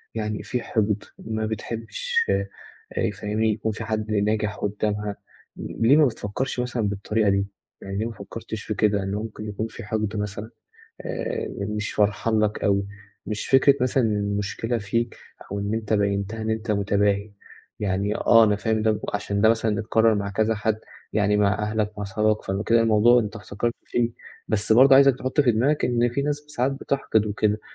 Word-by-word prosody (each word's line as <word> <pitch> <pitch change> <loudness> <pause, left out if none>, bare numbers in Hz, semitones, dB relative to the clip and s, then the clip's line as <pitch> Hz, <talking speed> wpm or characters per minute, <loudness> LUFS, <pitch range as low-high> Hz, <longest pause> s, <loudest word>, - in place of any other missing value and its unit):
يعني 105 -1 -3
في 125 - -2
حقد 105 -2 0 0.2
ما 110 0 -3
بتحبّش 115 - -4 0.6
آآ، - - -3
فاهمني 110 +1 -1
يكون 110 +1 -2
في 110 +2 -6
حد 110 -1 -2
ناجح 105 0 0
قُدّامها، 105 0 -2 0.4
ليه 120 +6 +2
ما 155 - +6
بتفكّرش 125 +2 -3
مثلًا 125 -2 -1
بالطريقة 105 +1 0
دي، 100 0 +1 0.3
يعني 95 0 -5
ليه 110 - -1
ما 115 - -3
فكّرتش 110 +1 -7
في 110 - -3
كده 105 -1 +1
إن 95 - -3
ممكن 105 0 -5
يكون 105 +2 -3
في 115 +1 -10
حقد 110 0 -2
مثلًا؟ 105 +1 -4 0.5
آآ، 470 -2 -3 0.3
مش 105 -1 -3
فرحان 105 +2 +1
لك 105 0 0
أوي 100 -1 +2 0.4
مش 105 -1 -3
فكرة 135 +1 +5
مثلًا 130 +1 +2
المشكلة 105 +2 -1
فيك، 115 +3 -2 0.4
أو 100 - -2
إن 100 +2 -2
أنت 110 -1 -3
بيّنتَها 100 +1 0
إن 110 - -2
أنت 110 0 -2
متباهي، 100 0 +1 0.5
يعني 100 0 0
آه 115 -1 +6
أنا 105 -1 +2
فاهم 110 0 0
ده 110 -1 +1
عشان 100 0 -1
ده 110 - +6
مثلًا 110 -2 +1
اتكرّر 110 +1 +3
مع 100 -1 -2
كذا 110 +3 +1
حد 110 0 -1 0.3
يعني 105 -1 +2
مع 105 0 +3
أهلك 105 0 -2
مع 105 - -3
صحابك، 105 +2 0
فكده 105 +4 +1
الموضوع 115 +2 +5
أنت 105 0 -4
احتكرت 115 +2 -3
فيه 120 -1 0 0.4
بس 110 0 +1
برضه 130 +4 +7
عايزك 135 -1 +6
تحُطّ 130 +4 0
في 125 -5 +4
دماغك 135 +7 +1
إن 120 -1 +2
في 120 +4 -2
ناس 145 0 0
ساعات 135 -2 0
بتحقد 135 -5 0
وكده 105 0 0
110 Hz, 175 wpm, -24 LUFS, 105-115 Hz, 0.6 s, برضه